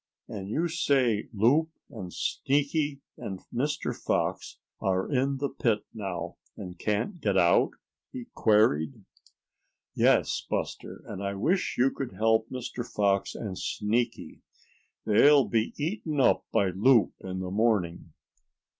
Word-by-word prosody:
"And 100 -2 -7
you 160 +10 0
say 135 -10 +1
Loup, 125 +10 +3 0.2
and 95 -8 -7
Sneaky 145 - -1 0.2
and 95 -2 -5
Mr. 145 +5 -1
Fox - - -2 0.2
are 95 -1 0
in 135 0 0
the 140 +1 -2
pit 115 -6 0
now, 95 -5 -5 0.2
and 90 -3 -8
can't 110 - -2
get 100 -5 +1
out?" 85 -1 +4 0.4
he 125 -2 -7
queried. 90 -9 +2 0.9
"Yes, - - +2
Buster, - - -4
and 95 - -7
I 100 0 -2
wish 170 - 0
you 130 +2 +3
could 135 -7 -5
help 110 +3 +2
Mr. 125 -1 -5
Fox 100 -4 0
and 95 -4 -5
Sneaky. 115 +3 -2 0.6
They'll 140 +6 +6
be 115 -1 0
eaten 155 -1 -2
up 130 - +3
by 95 -2 +2
Loup 110 +3 +4
in 95 -1 -6
the 90 -1 -4
morning." 100 -5 0
115 Hz, 130 wpm, -28 LUFS, 100-140 Hz, 0.9 s, They'll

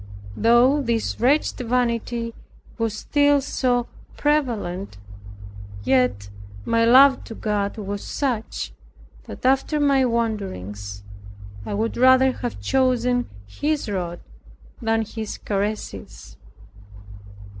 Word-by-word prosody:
Though 240 +6 +4
this 235 -4 -1
wretched 275 +6 +2
vanity 235 -1 -1 0.5
was 225 -2 -1
still 290 +3 +3
so 250 -3 0 0.3
prevalent, 225 - -1 0.9
yet 105 -6 +1 0.3
my 230 0 +2
love 265 +3 +6
to 225 - -8
God 205 -1 -2
was 200 -1 -5
such, 250 -6 -3 0.5
that - - -9
after 270 +3 +2
my 280 -2 +3
wanderings, 105 - -3 0.6
I - - -2
would 225 +2 -2
rather 260 +1 +6
have 245 -1 -5
chosen 250 -2 +1 0.2
His 295 - -2
rod 175 -3 -3 0.6
than 225 -1 +1
His 220 0 -6
caresses. 205 - -4
230 Hz, 100 wpm, -23 LUFS, 205-260 Hz, 0.9 s, love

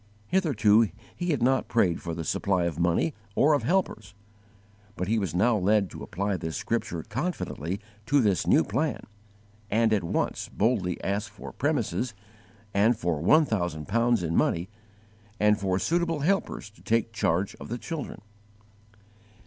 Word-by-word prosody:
Hitherto 115 - +4 0.3
he 175 0 -3
had 140 -7 +1
not 130 +1 +2
prayed 100 -8 +2
for 85 -2 -4
the 80 - -4
supply 95 +3 0
of 85 -2 -2
money 85 - +2 0.2
or 150 +2 +4
of 145 - +2
helpers, 110 - -1 0.8
but 90 - -3
he 110 +2 +2
was 95 -5 -3
now 110 +6 +3
led 100 0 +2
to - - -9
apply 100 +2 -2
this 80 -1 -4
scripture 110 -7 -2
confidently 105 - -3 0.3
to 145 +3 +4
this 105 -7 +2
new - - +5
plan, 135 - -1 0.7
and 110 +1 +3
at 105 - +1
once 85 - -2
boldly 100 -6 +1
to - - -11
ask 100 +1 -1
_for 105 - -10
premises, 125 -4 -1 0.6
and 110 +4 +3
for 85 -5 -1
one 155 - +5
thousand 85 - -2
pounds 115 0 +2
in 85 0 -1
money, 85 +4 +1 0.7
and 105 0 +4
for 95 -2 0
suitable 165 - 0
helpers 175 - -1
to 105 - -21
take 115 0 0
charge 95 -2 0
of - - -9
the 120 - -3
children. 145 -6 -6
105 Hz, 160 wpm, -27 LUFS, 90-125 Hz, 0.8 s, new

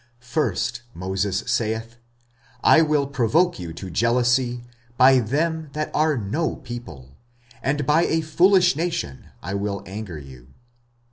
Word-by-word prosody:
First 120 - -1
Moses 95 +2 -2
saith, 115 +1 -2 0.7
I 160 - +7
will 150 -3 +2
provoke 140 - +1
you 85 -2 -6
to 90 +2 -8
jealousy 120 +3 +1 0.3
by 130 0 +7
them 155 +6 -1
that 155 0 -3
are 155 -1 +2
no 120 +10 -1
people, 75 - -9 0.5
and 145 +1 -1
by 150 +4 +3
a 160 - +1
foolish 180 +3 +4
nation 160 - -3 0.2
I 95 - -4
will 100 0 -3
anger 95 -3 -7
you. 65 -2 -13
120 Hz, 130 wpm, -23 LUFS, 100-155 Hz, 0.7 s, I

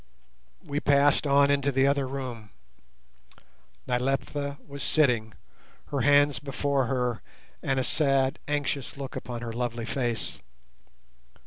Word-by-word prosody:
We 145 0 -2
passed 145 0 +3
on 140 0 +5
into 140 0 +2
the 135 0 +3
other 140 -1 +2
room. 125 -5 -6 1.4
Nyleptha 135 +3 -1
was 140 -1 -8
sitting, 120 -8 +2 0.5
her 140 -2 -1
hands 145 0 +4
before 140 -1 -1
her, 125 -3 -1 0.4
and 135 -1 0
a - - +1
sad 135 -1 +2
anxious 145 -2 -2
look 135 -1 -6
upon 120 0 -5
her 115 -1 -4
lovely 120 -1 -3
face. 120 -3 -3
135 Hz, 120 wpm, -27 LUFS, 125-140 Hz, 1.4 s, on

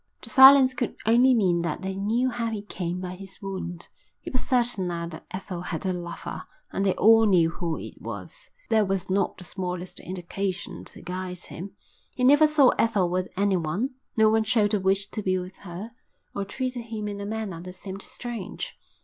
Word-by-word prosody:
The - - -6
silence 265 -1 +9
could 245 -2 -2
only 245 +3 +5
mean 180 -6 +3
that 170 +2 -3
they 190 0 -3
knew 230 +6 +1
how 235 -1 -2
he 215 -2 -4
came 180 -3 -4
by 180 -1 -4
his 190 0 -11
wound. 185 -3 -6 0.3
He - - -8
was 255 - 0
certain 240 -7 +1
now 170 -1 -3
that 165 -1 -9
Ethel 185 -2 -5
had 180 +1 -4
a 185 - +1
lover, 175 -1 -6 0.2
and 195 - -1
they 195 -2 +3
all 225 0 +6
knew 170 -4 +4
who 165 -2 -3
it - - -9
was. - - -8 0.2
But - - -1
there 215 - +5
was 190 -1 -2
not 195 0 +1
the 185 - -10
smallest 180 -1 -5
indication 185 +2 -4
to - - -10
guide 180 0 -4
him. 185 +2 -8 0.4
He 250 - -2
never 290 +4 +7
saw 295 -4 +5
Ethel 195 -6 +2
with 185 +1 0
anyone; 195 - +1 0.3
no 220 0 +6
one 220 +1 +3
showed 220 -1 +2
a 210 - +3
wish 195 +1 +1
to 215 - -3
be 185 -2 +1
with 185 +1 -6
her, 195 +4 -8 0.4
or 200 - -2
treated 250 +2 -3
him 220 -2 -4
in 200 -1 -5
a - - -4
manner 210 -6 -4
that 180 +1 -8
seemed 190 +1 -8
strange. 230 -4 -6
195 Hz, 200 wpm, -26 LUFS, 180-225 Hz, 0.4 s, silence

